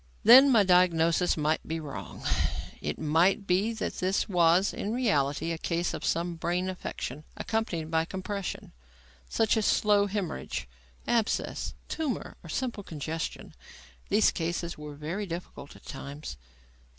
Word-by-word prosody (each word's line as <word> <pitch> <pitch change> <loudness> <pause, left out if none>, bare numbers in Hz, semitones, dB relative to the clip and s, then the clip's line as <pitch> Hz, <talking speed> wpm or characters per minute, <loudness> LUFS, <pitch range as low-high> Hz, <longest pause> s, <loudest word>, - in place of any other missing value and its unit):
Then, 260 +4 +9
my 225 -4 +6
diagnosis 180 -2 +3
might 155 +1 +1
be 160 +1 -2
wrong. 145 -4 -8 0.6
It - - -3
might 165 +6 +2
be 195 +5 +2
that 220 - -4
this 185 +2 +1
was, 175 0 +4
in 205 - -3
reality, 165 - +1
a 165 - -3
case 170 +1 -1
of - - -5
some 170 0 -1
brain 175 +3 -1
affection 150 -5 -6
accompanied 175 -8 -2
by 160 0 +2
compression, 190 +2 -5 0.6
such 225 0 +2
as 215 - +1
slow 205 -1 +4
haemorrhage, 195 - -3 0.4
abscess, 230 -2 0
tumour 305 -6 -3
or 170 - -12
simple 240 +3 -2
congestion. 160 -2 -5 0.6
These 210 +1 +4
cases 170 +1 -3
were 150 -1 -8
very 170 +8 -4
difficult 170 -4 -7
at - - -17
times. 140 - -7
175 Hz, 140 wpm, -29 LUFS, 160-205 Hz, 0.6 s, Then